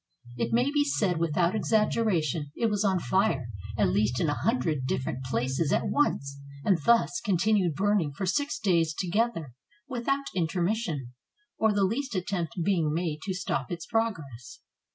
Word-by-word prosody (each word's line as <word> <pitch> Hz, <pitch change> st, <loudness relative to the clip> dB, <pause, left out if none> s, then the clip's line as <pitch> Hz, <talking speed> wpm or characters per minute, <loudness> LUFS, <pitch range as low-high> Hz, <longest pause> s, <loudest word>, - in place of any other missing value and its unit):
It 120 Hz, -, -2 dB
may 245 Hz, +4 st, +2 dB
be 290 Hz, 0 st, +3 dB
said 200 Hz, -, 0 dB
without 170 Hz, +2 st, +1 dB
exaggeration, 195 Hz, -, +1 dB
it 230 Hz, -2 st, +1 dB
was 205 Hz, 0 st, 0 dB
on 195 Hz, -2 st, +2 dB
fire 135 Hz, -, +1 dB, 0.3 s
at -, -, +3 dB
least 110 Hz, +4 st, +1 dB
in 160 Hz, -, +1 dB
a -, -, +1 dB
hundred 160 Hz, -, 0 dB
different 130 Hz, 0 st, -2 dB
places 130 Hz, +5 st, -1 dB
at -, -, +1 dB
once, 140 Hz, -, 0 dB, 0.3 s
and 190 Hz, -5 st, +3 dB
thus 235 Hz, +2 st, +3 dB
continued 195 Hz, -3 st, +2 dB
burning 195 Hz, -4 st, +1 dB
for 190 Hz, +7 st, -4 dB
six 285 Hz, +10 st, 0 dB
days 165 Hz, -6 st, +1 dB
together, 185 Hz, -, -1 dB, 0.3 s
without 275 Hz, +3 st, -1 dB
intermission, 170 Hz, -, -1 dB, 0.5 s
or 220 Hz, 0 st, +4 dB
the 200 Hz, -1 st, +1 dB
least 230 Hz, +5 st, -1 dB
attempt 180 Hz, -2 st, -2 dB
being 165 Hz, -5 st, +1 dB
made 160 Hz, -1 st, -2 dB
to 190 Hz, -2 st, -2 dB
stop 135 Hz, -8 st, -2 dB
its 170 Hz, -2 st, -4 dB
progress. 160 Hz, -, -3 dB
180 Hz, 155 wpm, -28 LUFS, 150-220 Hz, 0.5 s, or